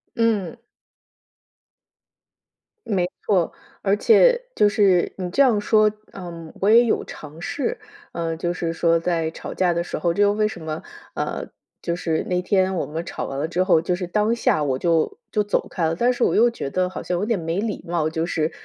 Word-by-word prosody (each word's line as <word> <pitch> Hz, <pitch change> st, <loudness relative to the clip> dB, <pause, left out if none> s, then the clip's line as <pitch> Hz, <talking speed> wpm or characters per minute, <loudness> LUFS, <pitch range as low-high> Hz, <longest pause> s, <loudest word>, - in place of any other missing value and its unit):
嗯。 230 Hz, -2 st, 0 dB, 2.3 s
没 185 Hz, -5 st, +1 dB, 0.2 s
错， 180 Hz, -5 st, +2 dB, 0.3 s
而 195 Hz, 0 st, +3 dB
且 485 Hz, -, +5 dB
就 210 Hz, -, +5 dB
是 200 Hz, -4 st, +3 dB
你 185 Hz, -2 st, -3 dB
这 195 Hz, -, +2 dB
样 230 Hz, -6 st, +3 dB
说 215 Hz, 0 st, +4 dB, 0.2 s
嗯， 170 Hz, -3 st, -8 dB
我 200 Hz, -, +3 dB
也 235 Hz, +2 st, +7 dB
有 225 Hz, -, +1 dB
尝 150 Hz, +1 st, -10 dB
试。 370 Hz, -, -3 dB, 0.3 s
嗯， 165 Hz, -1 st, -2 dB
就 175 Hz, +1 st, -1 dB
是 170 Hz, -2 st, -3 dB
说 165 Hz, 0 st, +2 dB
在 165 Hz, -1 st, 0 dB
吵 -, -, -7 dB
架 180 Hz, -2 st, +2 dB
的 170 Hz, 0 st, 0 dB
时 -, -, -5 dB
候 170 Hz, +2 st, +1 dB
这 205 Hz, -, +2 dB
又 205 Hz, 0 st, +4 dB
为 215 Hz, 0 st, +1 dB
什 215 Hz, -, -7 dB
么， 155 Hz, 0 st, -4 dB, 0.3 s
啊， -, -, -3 dB, 0.4 s
就 170 Hz, -, -2 dB
是 165 Hz, -2 st, -1 dB
那 180 Hz, -1 st, 0 dB
天 190 Hz, 0 st, +1 dB
我 175 Hz, -, -1 dB
们 165 Hz, +3 st, -5 dB
吵 -, -, -5 dB
完 135 Hz, -, -5 dB
了 145 Hz, +3 st, -1 dB
之 175 Hz, +2 st, 0 dB
后， 180 Hz, -4 st, +4 dB
就 175 Hz, +2 st, 0 dB
是 180 Hz, 0 st, -4 dB
当 210 Hz, +5 st, +1 dB
下 190 Hz, -9 st, +1 dB
我 130 Hz, -2 st, -1 dB
就 170 Hz, -, +1 dB
就 210 Hz, -, +1 dB
走 205 Hz, -, -1 dB
开 170 Hz, -, -1 dB
了， 160 Hz, +1 st, 0 dB
但 240 Hz, +7 st, +2 dB
是 245 Hz, -1 st, -1 dB
我 -, -, +2 dB
又 235 Hz, +3 st, +5 dB
觉 235 Hz, -12 st, -5 dB
得 185 Hz, +2 st, 0 dB
好 185 Hz, -, -7 dB
像 180 Hz, -, -2 dB
有 180 Hz, -, -2 dB
点 225 Hz, -1 st, 0 dB
没 165 Hz, +2 st, -2 dB
礼 215 Hz, -2 st, -3 dB
貌， 165 Hz, -2 st, 0 dB
就 160 Hz, +1 st, -2 dB
是 160 Hz, -2 st, -1 dB
180 Hz, 220 characters per minute, -22 LUFS, 165-210 Hz, 2.3 s, 也